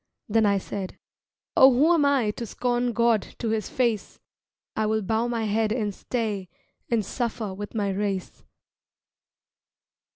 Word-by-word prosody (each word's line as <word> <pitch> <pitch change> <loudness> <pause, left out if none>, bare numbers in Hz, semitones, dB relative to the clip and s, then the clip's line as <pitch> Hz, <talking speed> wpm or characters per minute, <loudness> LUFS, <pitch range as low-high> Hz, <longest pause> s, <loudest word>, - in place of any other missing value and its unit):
Then 220 0 +3
I 200 -1 +3
said, 195 0 -5 0.6
"Oh 265 +1 +8
who 295 +7 +4
am 310 -4 +3
I 270 -7 +3
To 235 - -6
scorn 245 +2 0
God 235 -2 +3 0.2
to 230 - -2
his 220 -1 -1
face? 235 -5 -1 0.6
I 215 - +1
will 220 0 0
bow 225 +4 0
my 235 -2 -1
head 215 0 +1
and 215 -3 -1
stay 210 -5 -3 0.4
And 225 -4 +1
suffer 225 -3 -3
with 205 +3 -7
my 200 -2 0
race." 195 -1 -3
220 Hz, 150 wpm, -26 LUFS, 205-240 Hz, 0.6 s, Oh